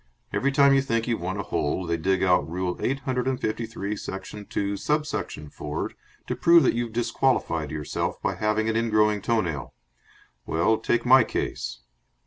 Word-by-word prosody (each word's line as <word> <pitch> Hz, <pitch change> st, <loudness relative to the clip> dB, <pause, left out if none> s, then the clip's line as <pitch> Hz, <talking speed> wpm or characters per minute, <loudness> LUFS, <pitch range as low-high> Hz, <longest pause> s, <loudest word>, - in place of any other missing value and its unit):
Every 140 Hz, -, +1 dB
time 140 Hz, 0 st, +5 dB
you 135 Hz, -, +4 dB
think 115 Hz, -3 st, -1 dB
you've 115 Hz, -6 st, -1 dB
won 95 Hz, +3 st, -3 dB
a 100 Hz, -, -2 dB
hole, 80 Hz, +3 st, -1 dB
they 85 Hz, 0 st, 0 dB
dig 95 Hz, +4 st, +1 dB
out 90 Hz, -5 st, +3 dB
Rule 90 Hz, +1 st, -2 dB
eight 135 Hz, +1 st, -1 dB
hundred 130 Hz, -1 st, -1 dB
and 130 Hz, -1 st, 0 dB
fifty 110 Hz, +1 st, -2 dB
three, 105 Hz, -2 st, -4 dB
section 100 Hz, +1 st, -7 dB
two, 100 Hz, 0 st, -1 dB
sub 150 Hz, +8 st, 0 dB
section 145 Hz, -, -5 dB
four, 75 Hz, 0 st, -4 dB, 0.3 s
to 125 Hz, -, -2 dB
prove 170 Hz, +6 st, +6 dB
that -, -, +3 dB
you've 120 Hz, -1 st, -2 dB
disqualified 115 Hz, -, 0 dB
yourself 75 Hz, 0 st, -3 dB
by -, -, -1 dB
having 110 Hz, +1 st, 0 dB
an 110 Hz, -, 0 dB
ingrowing 105 Hz, -2 st, +2 dB
toe 115 Hz, +2 st, +2 dB
nail. 75 Hz, -8 st, -5 dB, 0.7 s
Well, 85 Hz, +7 st, +2 dB
take 120 Hz, -, 0 dB
my 130 Hz, 0 st, +7 dB
case." -, -, -4 dB
110 Hz, 185 wpm, -25 LUFS, 90-125 Hz, 0.7 s, my